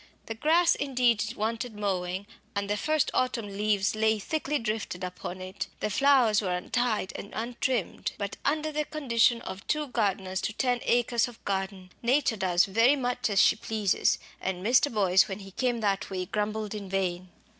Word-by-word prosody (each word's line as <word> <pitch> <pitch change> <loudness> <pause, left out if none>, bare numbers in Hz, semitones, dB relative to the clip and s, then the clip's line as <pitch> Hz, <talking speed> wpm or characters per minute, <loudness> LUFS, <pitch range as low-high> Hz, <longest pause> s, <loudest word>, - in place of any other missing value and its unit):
The 225 - -4
grass 325 +9 +4
indeed 245 -6 +1
wanted 225 +2 -3
mowing, 190 -2 -2 0.3
and 200 0 -1
the 205 - 0
first 310 +6 +1
autumn 250 -3 0
leaves 205 -1 +1
lay 220 0 +2
thickly 300 +6 -2
drifted 215 -6 -3
upon 180 0 -6
it; 185 +2 -5
the 210 - -2
flowers 250 -3 +4
were 185 -3 -1
untied 220 0 -1
and 200 - -7
untrimmed. 235 -1 -2
But 200 -1 -4
under 310 +2 0
the 300 0 -1
condition 240 -6 +2
of 190 - -8
two 300 -2 0
gardeners 195 -5 -1
to 215 - -2
ten 245 +1 0
acres 240 0 +2
of 240 -2 -14
garden, 190 -1 -3
nature 255 0 +2
does 185 -3 +2
very 230 +7 +4
much 245 -4 -1
as 200 -2 +2
she - - +6
pleases, 215 -3 +1 0.2
and 185 0 -3
Mr. 255 +5 +4
Boyce 190 -4 +4
when 190 - -4
he 195 -1 -11
came 240 +2 -1
that 200 -2 0
way 185 -1 -3
grumbled 210 +2 -2
in 205 -2 -6
vain. 185 -1 -2
215 Hz, 175 wpm, -28 LUFS, 195-245 Hz, 0.3 s, she